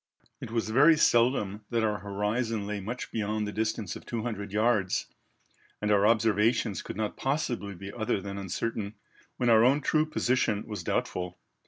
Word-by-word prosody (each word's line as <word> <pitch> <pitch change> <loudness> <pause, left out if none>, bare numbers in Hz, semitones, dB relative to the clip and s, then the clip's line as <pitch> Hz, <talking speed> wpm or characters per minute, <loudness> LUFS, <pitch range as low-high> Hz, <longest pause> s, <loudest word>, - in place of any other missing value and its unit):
It - - -7
was 115 -1 -1
very 150 +7 +6
seldom 115 -6 +2
that 115 -2 +1
our 105 -2 0
horizon 105 +3 -2
lay 105 0 -3
much 115 +6 -5
beyond 105 0 -1
the 105 - -4
distance 110 -3 -2
of - - -9
200 110 -4 -4
yards, 105 -3 +1 0.7
and 105 0 0
our 105 0 +5
observations 110 -2 +2
could - - -7
not 110 -1 -2
possibly 125 -8 -2
be 100 +2 -8
other 110 -3 -1
than 100 0 -6
uncertain, 100 +2 -3 0.4
when 120 -1 +2
our 110 0 +7
own 135 +4 +5
true 155 +1 +2
position 125 -8 0
was 105 -5 -6
doubtful. 90 +1 -2
110 Hz, 165 wpm, -28 LUFS, 100-120 Hz, 0.7 s, our